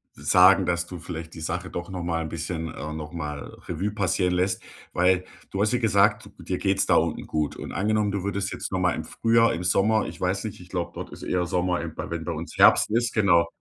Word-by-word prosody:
sagen, -, -, +5 dB
dass 85 Hz, 0 st, 0 dB
du 90 Hz, -2 st, -8 dB
vielleicht 80 Hz, -1 st, -7 dB
die 80 Hz, -, -8 dB
Sache 90 Hz, +3 st, -3 dB
doch 85 Hz, +1 st, -5 dB
noch 90 Hz, -2 st, -5 dB
mal 85 Hz, -1 st, -1 dB
'n 80 Hz, -, -5 dB
bisschen, 80 Hz, +1 st, -4 dB
äh 75 Hz, -, -6 dB
noch 75 Hz, -1 st, -6 dB
mal 75 Hz, -3 st, -6 dB
Revue 95 Hz, +5 st, -2 dB
passieren 95 Hz, -2 st, +1 dB
lässt, 95 Hz, +1 st, 0 dB, 0.3 s
weil 90 Hz, +1 st, +3 dB, 0.3 s
du 100 Hz, -, -2 dB
hast 110 Hz, +4 st, +2 dB
ja 125 Hz, -, +2 dB
gesagt, 105 Hz, 0 st, +3 dB
du 90 Hz, -, -12 dB
dir 90 Hz, +2 st, -2 dB
geht's 95 Hz, -1 st, +2 dB
da -, -, +4 dB
unten 80 Hz, -1 st, 0 dB
gut. 75 Hz, -1 st, -1 dB
Und -, -, -7 dB
angenommen, 105 Hz, +2 st, +1 dB
du 100 Hz, -, -2 dB
würdest 100 Hz, -1 st, -2 dB
jetzt -, -, -5 dB
noch 95 Hz, -, 0 dB
mal 90 Hz, -1 st, +2 dB
im 80 Hz, -, -4 dB
Frühjahr, 115 Hz, +4 st, +3 dB
im 90 Hz, -, -4 dB
Sommer, 105 Hz, +5 st, +3 dB
ich -, -, -9 dB
weiß 95 Hz, +3 st, 0 dB
nicht, 105 Hz, -4 st, -6 dB
ich 90 Hz, -, -14 dB
glaube, 85 Hz, -2 st, -3 dB
dort -, -, -6 dB
ist -, -, -10 dB
eher 90 Hz, -1 st, 0 dB
Sommer, 90 Hz, +1 st, 0 dB
eben 85 Hz, -2 st, -6 dB
bei -, -, -5 dB
wenn 85 Hz, -1 st, -3 dB
bei 85 Hz, -, -2 dB
uns 80 Hz, +2 st, -7 dB
Herbst -, -, +6 dB
ist, 120 Hz, +1 st, +1 dB
genau. 85 Hz, -6 st, +4 dB
90 Hz, 245 wpm, -25 LUFS, 85-100 Hz, 0.3 s, Herbst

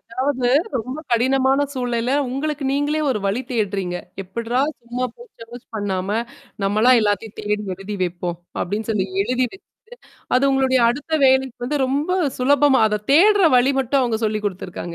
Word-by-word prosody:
அதாவது 255 Hz, +1 st, -2 dB, 0.3 s
ரொம்ப 255 Hz, +6 st, -5 dB
கடினமான 265 Hz, +3 st, +2 dB
சூழல்ல 245 Hz, 0 st, -1 dB, 0.2 s
உங்களுக்கு 290 Hz, +2 st, -3 dB
நீங்களே 290 Hz, +2 st, 0 dB
ஒரு 220 Hz, -, 0 dB
வழி 205 Hz, +6 st, 0 dB
தேடுறீங்க. 195 Hz, -6 st, -1 dB, 0.3 s
"எப்பட்றா 235 Hz, +6 st, -2 dB, 0.2 s
சும்மா 240 Hz, +2 st, -4 dB
போய் 480 Hz, -, -14 dB
சேர்ச் 235 Hz, +2 st, -11 dB
பண்ணாம 205 Hz, 0 st, -2 dB, 0.5 s
நம்மளா 215 Hz, +5 st, +3 dB
எல்லாத்தையும் 205 Hz, 0 st, -1 dB
தேடி 210 Hz, 0 st, -1 dB
எழுதி 195 Hz, +3 st, -7 dB
வைப்போம்." 175 Hz, -1 st, -3 dB, 0.2 s
அப்படின்னு 210 Hz, +5 st, -3 dB
சொல்லி 195 Hz, -3 st, 0 dB, 0.2 s
எழுதி 250 Hz, +4 st, 0 dB
வெச்சுட்டு 380 Hz, -, -17 dB, 0.6 s
அது 255 Hz, -, +2 dB
உங்களுடைய 265 Hz, -1 st, +2 dB
அடுத்த 290 Hz, +6 st, -4 dB
வேலைக்கு 265 Hz, -1 st, +3 dB
வந்து, 295 Hz, +4 st, -1 dB
ரொம்ப 285 Hz, +6 st, -1 dB, 0.3 s
சுலபமா 280 Hz, +1 st, +4 dB
அத 210 Hz, 0 st, -2 dB
தேடுற 405 Hz, +5 st, +5 dB
வழி 255 Hz, +3 st, +4 dB
மட்டும் 270 Hz, +2 st, +1 dB
அவங்க 235 Hz, -3 st, 0 dB
சொல்லி 215 Hz, 0 st, 0 dB
குடுத்துருக்காங்க. 180 Hz, -2 st, -6 dB
245 Hz, 150 wpm, -21 LUFS, 210-270 Hz, 0.6 s, தேடுற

